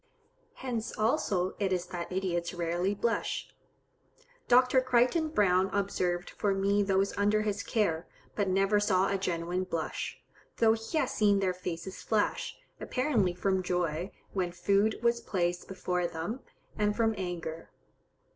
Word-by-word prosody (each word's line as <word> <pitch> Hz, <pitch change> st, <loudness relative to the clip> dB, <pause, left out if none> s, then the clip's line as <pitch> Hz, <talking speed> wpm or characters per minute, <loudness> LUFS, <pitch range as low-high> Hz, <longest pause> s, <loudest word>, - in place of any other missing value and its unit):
Hence, 235 Hz, -4 st, -4 dB
also, 210 Hz, -, +1 dB
it 195 Hz, -2 st, 0 dB
is 180 Hz, -1 st, 0 dB
that 175 Hz, -1 st, -6 dB
idiots 180 Hz, -2 st, -1 dB
rarely 175 Hz, +3 st, 0 dB
blush. 230 Hz, +3 st, -1 dB, 1.0 s
Dr. 255 Hz, +1 st, +5 dB
Crichton 255 Hz, +6 st, +2 dB
Browne 190 Hz, -8 st, +3 dB
observed 180 Hz, -3 st, -1 dB
for 200 Hz, -2 st, 0 dB
me 200 Hz, +1 st, +2 dB
those 195 Hz, 0 st, +1 dB
under 210 Hz, +1 st, +3 dB
his 205 Hz, -1 st, -1 dB
care, 180 Hz, -9 st, 0 dB, 0.3 s
but 205 Hz, -2 st, 0 dB
never 195 Hz, +2 st, +3 dB
saw 195 Hz, -2 st, +2 dB
a 200 Hz, -, +1 dB
genuine 175 Hz, 0 st, -1 dB
blush, 165 Hz, -3 st, -3 dB, 0.4 s
though 225 Hz, -1 st, +5 dB
he 225 Hz, +8 st, -3 dB
has -, -, +1 dB
seen 205 Hz, -2 st, +3 dB
their 190 Hz, -2 st, +1 dB
faces 180 Hz, +1 st, -6 dB
flush, 215 Hz, -2 st, 0 dB, 0.2 s
apparently 240 Hz, -10 st, +1 dB
from 190 Hz, +1 st, +1 dB
joy, 175 Hz, -1 st, -1 dB, 0.2 s
when 180 Hz, -3 st, -1 dB
food 200 Hz, +5 st, +2 dB
was 235 Hz, 0 st, +2 dB
placed 175 Hz, -2 st, -1 dB
before 180 Hz, -2 st, -1 dB
them, 170 Hz, +10 st, -4 dB, 0.4 s
and 210 Hz, -1 st, +1 dB
from 225 Hz, -1 st, +2 dB
anger. 170 Hz, -3 st, -5 dB
195 Hz, 140 wpm, -30 LUFS, 180-215 Hz, 1.0 s, Dr